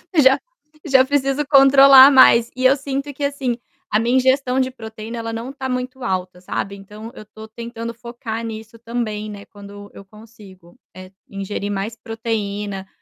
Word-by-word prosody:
Já 265 -3 +5 0.5
já 265 -1 +5
preciso 280 +1 0
controlar 275 -1 +8
mais. 240 -3 +6
E 255 0 -2
eu 270 +2 +6
sinto 275 +1 -5
que 285 - -7
assim, 275 -4 -2 0.4
a 215 - +2
minha 240 +3 0
ingestão 260 0 +1
de 260 0 0
proteína 220 -1 -9
ela 230 0 -5
não 240 +4 -6
tá 265 -1 -6
muito 255 0 -4
alta, 180 -1 -4
sabe. 195 +2 -4
Então 210 +3 -11
eu - - -11
tô 220 +1 -13
tentando 230 +1 -7
focar 230 -1 -7
nisso 220 0 -8
também, 225 -3 -4
né, 200 -1 -10
quando 205 0 -13
eu 200 - -12
consigo, 200 -4 -17 0.2
eh, 185 0 -12 0.2
ingerir 200 +1 -5
mais 205 +3 -4
proteína. 210 -3 -5
230 Hz, 165 wpm, -20 LUFS, 210-260 Hz, 0.5 s, controlar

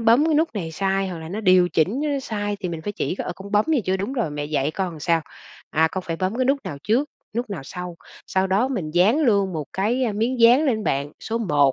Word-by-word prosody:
bấm 230 +6 +5
cái 315 - +2
nút 320 +2 +3
này 165 -5 -4
sai 195 +2 0
hoặc 175 -2 -5
là 160 0 -8
nó 205 +5 -4
điều 185 -3 +5
chỉnh, 190 - +1
ơ, - - 0
nó 280 -1 0
sai 205 -4 -3
thì 180 - -2
mình 165 -2 -5
phải 205 - -3
chỉ, 185 - -2
ờ: 180 - -3
"Con 200 +2 -10
bấm 210 +1 +4
này 290 -8 +2
chưa? 185 +1 +1
Đúng 200 +7 -3
rồi, 235 - -1
mẹ 145 0 -4
dạy 145 -1 0
con 185 +1 -2
làm 160 - -10
sao? 165 +1 +2 0.5
À, 160 +1 +3
con 190 - -3
phải 165 -1 -2
bấm 185 +5 -1
cái 255 - +1
nút 275 +2 +2
nào 145 - -5
trước, 260 +7 +1 0.3
nút 240 -2 -2
nào 180 -9 -4
sau." 180 +2 -7 0.3
Sau 190 0 +1
đó 200 +7 +2
mình 185 -13 -3
dán 190 - +4
luôn 200 -8 +3
một 155 -2 -3
cái, 235 +7 +1
ơ, 220 - 0
miếng 235 +4 -1
dán 245 +6 +7
lên 225 -7 0
bạn, 140 +2 -1
số 230 +1 -2
1 145 - +3
195 Hz, 275 wpm, -23 LUFS, 170-230 Hz, 0.5 s, dán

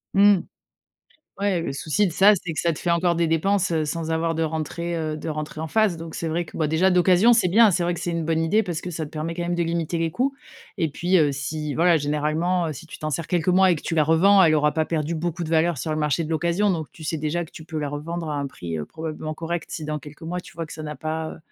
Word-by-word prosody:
Mmh. 200 -1 +6 1.0
Ouais 200 -4 +1
le 135 - -3
souci 160 +8 0
de 170 - -3
ça, 200 +4 +6
c'est 175 -1 -5
que 155 - -2
ça 170 -1 +1
te - - -7
fait 175 - 0
encore 170 0 +2
des 170 0 +2
dépenses, 175 +3 +1
heu, 160 -1 +1
sans 160 +1 -3
avoir 165 0 0
de 165 - +1
rentrée, 160 +2 -3
heu, 155 -1 -2
de 155 - -6
rentrée 155 0 -4
en 160 - -3
phase. 210 0 +2
Donc 165 -1 -8
c'est 165 - -3
vrai 170 +2 -1
que - - -12
bah, 155 -2 0
déjà 180 +5 +3
d'occasion 180 +5 +5
c'est 225 -6 +3
bien. 215 +3 +6
C'est 175 +1 +1
vrai 175 +1 +1
que 170 - -5
c'est 175 0 -3
une 170 -1 -2
bonne 160 0 +1
idée 190 +7 +2
parce 175 -5 -4
que 180 - -6
ça 160 0 -3
te 150 - -10
permet 160 +1 -4
quand 175 - -3
même 175 0 -1
de 175 - +1
limiter 165 0 -1
les 165 -1 -1
coûts 265 +7 0 0.5
et 160 - +1
puis, 175 +5 +1
heu, 150 -3 +3
si 150 +1 -4
voilà 170 +1 +4
généralement, 155 +4 0
heu, - - -3
si 155 +4 -10
tu - - -10
t'en 155 0 -2
sers 165 +2 -2
quelques 175 -2 0
mois 185 0 +5
et - - +3
que 155 - -7
tu 165 - -3
la 155 - +4
revends, 190 +6 +5
elle 155 - +4
aura 150 -1 +3
pas 160 - +1
perdu 160 0 -2
beaucoup 170 +1 -3
de 160 - -4
valeur 165 0 +2
sur 140 +5 -4
le 155 - -1
marché 150 +1 +1
de 160 - -5
l'occasion. 170 +5 +1
Donc 160 -4 -2
tu - - -13
sais 155 +1 -2
déjà 155 +3 -1
que 160 - -16
tu 160 - -11
peux 160 -1 -5
la 145 - -2
revendre 160 +3 -4
à 150 - -2
un 140 -1 -2
prix, 85 -11 -6
heu, 75 - -3
probablement 155 - -6
correct, 165 +1 -4
si 155 - -5
dans 150 0 -3
quelques 150 +2 -13
mois 180 +2 -3
tu - - -14
vois 165 -1 -5
que - - -11
ça 155 - -7
n'a 150 0 -5
pas, 155 +2 -4
heu, - - -11
165 Hz, 300 wpm, -24 LUFS, 155-175 Hz, 1.0 s, Mmh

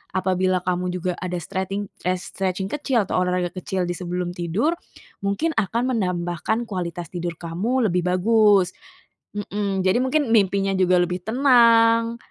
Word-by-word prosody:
apabila 185 -1 +1
kamu 180 0 -1
juga 180 0 -2
ada 180 0 -4
streting 190 +4 -4 0.2
eh, 185 - +2
stretching 190 +1 -3
kecil 265 -6 0
atau - - 0
olahraga 180 -1 0
kecil 185 0 -2
di 175 - -2
sebelum 180 0 -3
tidur, 180 - 0 0.5
mungkin 200 +12 0
akan 230 +5 0
menambahkan 180 +3 -1
kualitas 175 -3 -5
tidur 175 -1 -4
kamu 210 +8 0
lebih 180 -1 0
bagus. 200 0 +4 0.7
Mhm. 200 -2 -2
Jadi 185 +5 +3
mungkin 260 -1 +1
mimpinya 195 -2 +2
juga 185 -1 +3
lebih 180 +1 -1
tenang, 230 -2 +4
190 Hz, 140 wpm, -23 LUFS, 180-225 Hz, 0.7 s, bagus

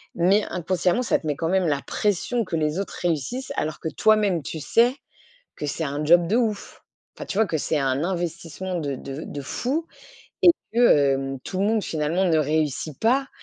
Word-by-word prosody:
mais 190 +5 +3
inconsciemment, 180 +4 0
ça - - +1
te 160 - -7
met, 150 - 0
quand 165 +3 -2
même, 185 -2 +2
la 140 -2 0
pression 210 +3 0
que 170 - -3
les 155 +2 0
autres 200 - -4
réussissent, 175 - -2
alors 155 0 -2
que 160 - -2
toi-même, 205 +1 +2
tu 160 - -6
sais 240 - +3 0.6
que - - -6
c'est 145 - -3
un 145 +1 -3
job 170 +2 +5
de 210 +7 +1
ouf! 220 -5 -2 0.3
Enfin, - - -6
tu 195 - -3
vois, 220 - +4
que 160 - -1
c'est 155 +1 -1
un 135 +1 0
investissement 175 0 -4
de 140 -4 -3
de 135 +3 -7
de 145 - -6
fou 275 - -2 0.6
et 350 - +9 0.2
que, 235 - 0 0.3
hem, 135 0 -3
tout 185 - -3
le 200 - +2
monde, 220 -2 +1
finalement, 160 +4 0
ne 165 -4 +3
réussit 155 -1 -1
pas. 265 +4 +2
170 Hz, 200 wpm, -24 LUFS, 150-210 Hz, 0.6 s, et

